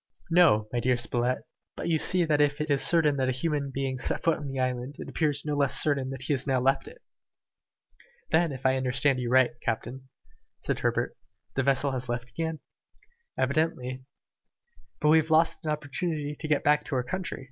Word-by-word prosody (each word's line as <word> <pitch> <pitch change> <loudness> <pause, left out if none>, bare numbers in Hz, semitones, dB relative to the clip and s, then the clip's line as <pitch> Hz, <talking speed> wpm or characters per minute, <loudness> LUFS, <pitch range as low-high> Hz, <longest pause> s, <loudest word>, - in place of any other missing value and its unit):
"No, 165 -12 +5
my 120 - +1
dear 125 +1 +2
Spilett, 120 +1 -1 0.3
but - - -5
you 165 -2 +2
see 180 +1 +3
that 150 -2 +2
if 145 0 +2
it 150 0 -1
is 140 - +3
certain 155 -4 +3
that 130 -1 +1
a - - +2
human 145 +1 -1
being 135 -1 -3
set - - -1
foot 165 -2 +2
on 145 - -6
the 135 0 -5
island, 130 +2 -2
it - - -7
appears 150 -3 -1
no 150 -1 -1
less 140 -2 +2
certain 140 -3 +1
that 135 -1 -5
he 145 - 0
has 135 0 -1
now 130 -1 +2
left 135 - +1
it." - - -13 1.3
"Then, 170 -2 +3
if 135 -1 -8
I 130 0 +3
understand 130 +1 +1
you 120 -1 -2
right, 130 0 +4
captain," 130 +3 -4 0.5
said - - -2
Herbert, - - -1 0.4
"the 135 - 0
vessel 140 +1 +2
has 130 -1 -4
left 120 0 -4
again?" 160 +2 -3 0.8
"Evidently." 130 -2 -1 1.0
"And 150 - +5
we 160 - +7
have 160 +1 -3
lost 160 +1 +3
an 155 - -3
opportunity 150 0 -3
to 155 - -4
get 150 -2 +1
back 150 0 +3
to 140 - -3
our 125 - +1
country?" 175 +6 -4
140 Hz, 200 wpm, -27 LUFS, 130-155 Hz, 1.3 s, we